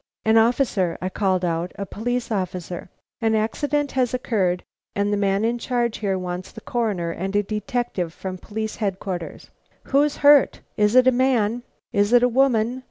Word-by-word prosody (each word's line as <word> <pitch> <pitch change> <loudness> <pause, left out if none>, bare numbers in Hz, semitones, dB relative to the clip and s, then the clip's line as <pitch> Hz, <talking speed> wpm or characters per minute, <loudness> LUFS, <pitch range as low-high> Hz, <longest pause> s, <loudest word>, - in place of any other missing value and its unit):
"An 220 0 +4
officer!" 225 -6 +2
I 185 - -2
called 185 -2 0
out, 170 +1 -2
"a 200 - -3
police 245 +4 -3
officer! 185 -3 -4 0.3
An 225 -1 +2
accident 285 +6 0
has 255 -2 0
occurred 190 -8 0 0.3
and 205 +1 +1
the - - +3
man 200 +1 +1
in 240 +1 0
charge 240 -1 -1
here 195 -3 0
wants 180 0 -5
the - - -10
Coroner 205 -8 -2
and 190 +4 -4
a 205 - +3
detective 215 - -2
from 185 +2 -6
Police 220 +2 -5
Headquarters." 190 -4 -4 0.3
"Who's 290 +2 +2
hurt?" 285 -2 +6
"Is 210 +2 +2
it 255 0 +7
a 260 - +6
man?" 245 -3 +1 0.3
"Is 205 +1 +2
it 245 0 +6
a - - +6
woman?" 245 -1 +2
215 Hz, 170 wpm, -23 LUFS, 190-245 Hz, 0.3 s, it